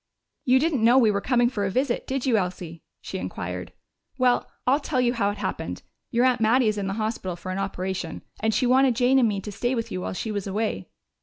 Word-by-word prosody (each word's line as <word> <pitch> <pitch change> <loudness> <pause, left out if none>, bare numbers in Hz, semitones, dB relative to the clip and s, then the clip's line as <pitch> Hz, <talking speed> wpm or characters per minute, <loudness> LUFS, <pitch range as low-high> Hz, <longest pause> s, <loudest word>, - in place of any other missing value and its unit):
"You 255 0 +5
didn't 285 -4 +1
know 240 +3 +6
we 230 -5 +5
were 200 0 -1
coming 245 0 +3
for 225 -5 -2
a 195 - 0
visit, 250 +4 -1
did 270 0 -2
you, 255 -4 +3
Elsie?" 180 -4 -3 0.2
she - - -5
inquired. - - -5 0.5
"Well, 250 -2 +2 0.2
I'll 270 +3 +3
tell 285 -3 -1
you 245 -1 +2
how 205 -5 +1
it 205 - -4
happened: - - -4 0.3
Your 240 +1 +2
aunt 250 -3 +2
Mattie 230 +1 +4
is 210 -1 -2
in 195 - -2
the 195 - -2
hospital 215 -5 -3
for 180 +2 -7
an 185 - -3
operation, 190 -3 -4 0.2
and 220 0 +1
she 250 - +1
wanted 255 0 +4
Jane 255 +2 +4
and 240 - +4
me 200 -2 -2
to 210 - -7
stay 240 +5 -1
with 230 -1 -3
you 90 - -3
while 95 +1 -3
she 220 - -4
was 205 -2 -3
away." 210 +3 -2
225 Hz, 240 wpm, -25 LUFS, 195-255 Hz, 0.5 s, know